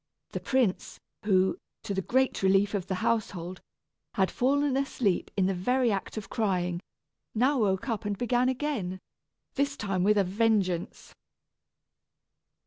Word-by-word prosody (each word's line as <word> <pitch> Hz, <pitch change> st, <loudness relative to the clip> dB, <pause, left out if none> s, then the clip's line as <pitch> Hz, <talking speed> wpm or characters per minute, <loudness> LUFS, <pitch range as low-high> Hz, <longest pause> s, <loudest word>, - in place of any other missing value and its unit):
The -, -, -3 dB
prince, 250 Hz, -8 st, 0 dB, 0.3 s
who, 190 Hz, -, +3 dB, 0.2 s
to 215 Hz, -3 st, -3 dB
the 190 Hz, -, 0 dB
great 260 Hz, +6 st, +1 dB
relief 195 Hz, +1 st, +3 dB
of 195 Hz, -3 st, -2 dB
the 190 Hz, -, -1 dB
household, 185 Hz, -6 st, -1 dB, 0.5 s
had 190 Hz, -1 st, +2 dB
fallen 280 Hz, +2 st, +1 dB
asleep 260 Hz, -8 st, 0 dB
in 190 Hz, -, +3 dB
the 195 Hz, -, +1 dB
very 245 Hz, +7 st, +1 dB
act 195 Hz, +2 st, -3 dB
of 205 Hz, -2 st, -5 dB
crying, 180 Hz, -5 st, 0 dB, 0.6 s
now 260 Hz, +5 st, +3 dB
woke 195 Hz, 0 st, +1 dB
up 225 Hz, -5 st, -2 dB
and 205 Hz, -1 st, -2 dB
began 245 Hz, +2 st, +2 dB
again, 250 Hz, -9 st, -2 dB, 0.5 s
this 280 Hz, 0 st, 0 dB
time 195 Hz, -3 st, -1 dB
with 210 Hz, +2 st, +4 dB
a 200 Hz, -, +5 dB
vengeance. 195 Hz, -3 st, 0 dB
205 Hz, 140 wpm, -28 LUFS, 190-250 Hz, 0.6 s, a